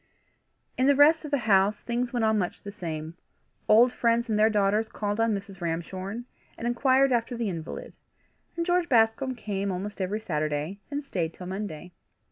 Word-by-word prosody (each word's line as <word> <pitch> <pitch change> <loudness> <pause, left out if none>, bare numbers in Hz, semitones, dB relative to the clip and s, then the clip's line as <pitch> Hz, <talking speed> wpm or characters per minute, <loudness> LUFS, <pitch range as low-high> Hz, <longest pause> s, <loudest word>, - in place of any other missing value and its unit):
In 260 - +4
the 285 - +5
rest 310 +3 +5
of - - -5
the 285 - +2
house 200 0 +4
things 240 +1 -2
went 240 -3 0
on 220 -1 +3
much 180 -3 -3
the 200 - -6
same. 160 -4 -5 0.5
Old 240 +4 +6
friends 235 0 +1
and 210 -1 +1
their 215 +1 +5
daughters 210 +1 +1
called 205 0 -3
on 225 0 +3
Mrs. 195 -2 -8
Ramshorn, 185 +7 -4 0.3
and 230 - -6
inquired 260 +3 +3
after 240 0 0
the 230 -3 -1
invalid, 165 -3 -6 0.6
and 335 - 0
George 355 0 +1
Bascombe 240 +2 +3
came 200 -3 -3
almost 195 +3 -5
every 195 +3 -1
Saturday, 155 -1 -2
and 285 +1 -3
stayed 170 -11 -3
till 180 - -9
Monday. 185 -3 -6
215 Hz, 180 wpm, -27 LUFS, 190-240 Hz, 0.6 s, Old